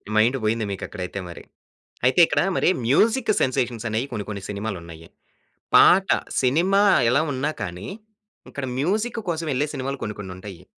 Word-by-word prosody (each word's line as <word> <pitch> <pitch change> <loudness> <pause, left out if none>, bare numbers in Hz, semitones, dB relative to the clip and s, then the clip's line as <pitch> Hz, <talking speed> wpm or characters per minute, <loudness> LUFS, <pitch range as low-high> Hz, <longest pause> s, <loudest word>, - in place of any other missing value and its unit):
Mind 115 +5 +3
పోయింది 110 +1 0
మీకు 95 - -5
అక్కడైతే 95 0 -6
మరి. 85 - -10 0.6
అయితే 130 +8 +3
ఇక్కడ - - +1 0.2
మరి - - +2 0.2
మ్యూజిక్ 220 - +3
సెన్సేషన్స్ 125 -3 -1
అనేయి 110 +4 -1
కొన్ని, 105 -3 -3
కొన్ని 100 -2 -5
సినిమాలు 100 0 -4
ఉన్నాయి. 80 -1 -12 0.7
పాట 190 +1 +6 0.3
సినిమా 175 +10 +3 0.3
ఎలా 135 +4 +3
ఉన్నా 135 +3 -1
కానీ, 90 -1 -6 0.6
ఇక్కడ 140 - -5
మ్యూజిక్ 215 - -1
కోసం 165 -1 -2
వెళ్ళే 140 +3 0
సినిమాలు 135 +1 -4
కొన్ని 105 - -3
కొన్నుంటాయి. 95 -2 -9
120 Hz, 150 wpm, -23 LUFS, 100-150 Hz, 0.7 s, పాట